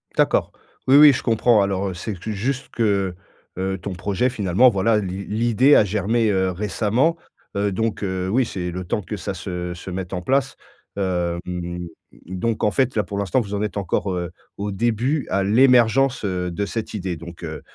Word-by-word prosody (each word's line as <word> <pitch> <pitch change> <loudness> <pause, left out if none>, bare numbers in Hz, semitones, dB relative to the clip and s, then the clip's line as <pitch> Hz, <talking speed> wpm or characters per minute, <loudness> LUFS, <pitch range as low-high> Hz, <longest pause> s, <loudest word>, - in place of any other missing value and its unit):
D'accord, - - +2 0.4
oui, 135 - +6
oui 150 0 +10
je 120 - -2
comprends 115 -2 +3
alors, 100 0 0
heu, 95 - -4
c'est 100 +5 -5
que 110 +5 -5
juste 130 +7 -3
que, 100 -5 0 0.4
heu 95 - -2
heu, - - -3
ton 95 +1 -6
projet 100 +7 0
finalement 105 +1 +4
voilà 105 +1 +2
l'i 95 0 -5
l'idée 120 +6 +3
a - - +6
germé, 105 +3 +1
heu, 95 -1 +1
récemment, 110 - 0 0.4
heu, 100 0 0
donc 110 +2 -2
heu, 95 -1 -2
oui 125 +5 +2
c'est 90 -5 -4
le 90 +1 -5
temps 90 +4 -2
que 90 - -6
ça - - -4
se 90 -1 -5
se 90 +2 -8
mette 90 0 -5
en 90 - -2
place, 135 +6 0 0.4
hem, 90 -1 -3 0.4
donc 95 +6 -2
en 105 - +3
fait 130 +1 +1
là 105 - +2
pour 100 +1 -6
l'instant 100 +5 +1
vous 105 -3 -6
en 100 - -1
êtes 105 -1 -3
encore, 100 0 -1
heu, 90 -1 -3 0.3
au 105 +1 -3
début, 120 +7 0
à 100 0 +1
l'émergence, 125 +3 +4
heu, 90 -2 -2
de 100 +4 -2
cette 110 +2 -5
idée 95 -4 -3
donc, 85 +1 -11
heu 80 -1 -6
100 Hz, 200 wpm, -22 LUFS, 90-115 Hz, 0.4 s, oui